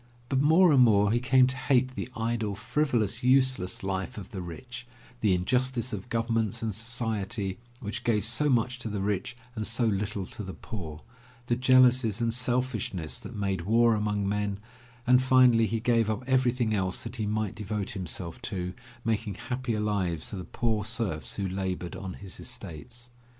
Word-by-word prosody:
But 135 -1 +2
more 160 +4 +6
and 135 -3 +6
more 105 -4 +5
he 120 - +2
came 130 +1 +5
to 130 0 -1
hate 130 0 +2
the 130 - -5
idle, 115 -2 -1
frivolous, 115 -1 0
useless 130 -8 +2
life 95 +1 -3
of 105 +2 -8
the 95 -5 -5
rich, 120 +8 -8 0.3
the 105 -5 +3
injustice 125 +5 0
of 105 +3 -5
governments 115 -2 0
and 110 -2 -1
society 110 -3 -2 0.2
which 110 +1 -5
gave 105 -4 +1
so 115 +6 +2
much 125 -1 +1
to 115 - -4
the 105 -1 -3
rich 105 +4 -2 0.2
and 110 -2 -3
so 115 +1 0
little 100 -2 -1
to 105 - -8
the 95 -2 -6
poor, 80 -8 -7 0.4
the 120 - +1
jealousies 125 -3 +4
and 115 -1 0
selfishness 120 -9 -1
that 120 - -9
made 100 -3 -1
war 115 +5 +4
among 105 -2 0
men, 100 0 -1 0.5
and 125 +1 +5
finally 125 -3 +5
he 115 +3 -1
gave 115 -1 +2
up 110 +4 -2
everything 125 -3 +2
else 95 -3 -1
that 125 - -6
he 110 -2 -1
might 105 -1 -1
devote 105 0 -3
himself 90 -4 -5
to 90 -3 -3 0.3
making 110 -3 -1
happier 125 -1 -3
lives 95 -7 -1
for 100 - -5
the 90 - -6
poor 110 -3 -1
serfs 100 - -2
who 100 - -2
labored 95 -2 -3
on 95 -1 -6
his 95 -3 -8
estates. 115 +11 -7
110 Hz, 175 wpm, -28 LUFS, 100-125 Hz, 0.5 s, more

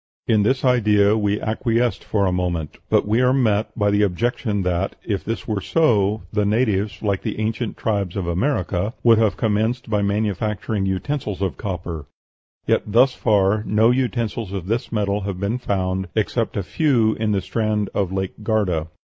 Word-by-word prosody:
In 110 -2 +3
this 130 +6 +1
idea 105 -4 +4
we 105 -1 0
acquiesced 115 +2 0
for 100 -2 0
a 95 - +1
moment. 90 -4 -2
But - - +2
we 110 +4 +2
are 125 0 +4
met 110 -5 +2
by 105 -2 +2
the 105 0 +2
objection 105 +1 0
that, 90 +1 -1
if 100 -4 -2
this 115 0 -4
were 105 -2 -1
so, 105 - +2
the 105 -1 +2
natives, 105 -1 0
like 100 -3 0
the - - -4
ancient 110 +1 -2
tribes 100 -5 -1
of 95 -3 -2
America, 95 - -1
would 115 -2 +6
have 110 -4 +2
commenced 110 +2 0
by 105 -1 +2
manufacturing 105 0 -1
utensils 100 0 -2
of 95 - -1
copper; 85 -6 -5 0.6
yet - - +2
thus 125 +5 +4
far 105 -1 +2
no 110 +3 +4
utensils 120 -5 -1
of 95 -3 -4
this 115 +5 -2
metal 105 -2 0
have 95 -2 -4
been 105 +5 -1
found 95 -3 -1
except 110 +1 -1
a 100 - -1
few 120 - +2
in 110 -1 -1
the 100 - +2
strand 105 +1 -1
of 95 -3 -1
Lake 95 +2 -4
Garda. 100 -7 0
105 Hz, 175 wpm, -21 LUFS, 95-115 Hz, 0.6 s, would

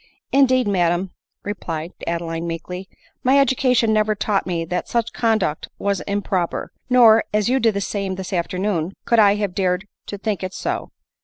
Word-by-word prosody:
" - - -70
Indeed, 255 -3 +4
madam," 180 -1 +1 0.3
replied 170 -5 -4 0.2
Adeline 165 0 -2
meekly, 180 +3 -6 0.2
" - - -35
my 260 +2 +4
education 255 -4 +3
never 215 0 +2
taught 200 -2 0
me 170 -2 -1
that 180 +2 -3
such 235 -1 -1
conduct 220 -10 0
was 200 -2 -1
impro 195 -3 0
per; - - -6 0.2
nor, 230 -3 +7
as 210 +1 +1
you 265 +1 +3
did 225 -4 +2
the 200 - -1
same 195 -1 -2
this 190 0 -6
afternoon, 180 0 -1
could 235 -1 +3
I 205 -1 +6
have 205 -3 -2
dared 185 0 0 0.2
to 205 - -5
think 205 0 -2
it 185 0 -5
so." - - -3
200 Hz, 180 wpm, -21 LUFS, 180-220 Hz, 0.3 s, nor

